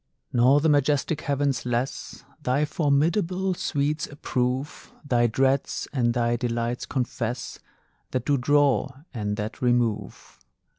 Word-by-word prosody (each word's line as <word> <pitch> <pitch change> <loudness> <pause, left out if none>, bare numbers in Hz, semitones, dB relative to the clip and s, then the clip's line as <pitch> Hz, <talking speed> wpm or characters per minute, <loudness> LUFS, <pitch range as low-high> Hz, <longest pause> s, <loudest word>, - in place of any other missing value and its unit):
Nor 130 +4 +5
the 160 - +2
majestic 145 +1 +2
heavens 140 -3 0
less 125 +2 -3 0.2
Thy 135 +4 +1
formidable 170 +6 +1
sweets 155 -4 -1
approve, 130 -1 -3 0.2
Thy 120 -3 +3
dreads 135 +4 0
and 120 -3 +1
thy 120 0 +1
delights 120 0 -2
confess 120 -2 -3 0.5
That 130 -2 -2
do 145 - +3
draw, 140 +1 +3 0.2
and 105 -3 -2
that 105 +1 -5
remove. 120 -4 -1
130 Hz, 115 wpm, -25 LUFS, 120-145 Hz, 0.5 s, Nor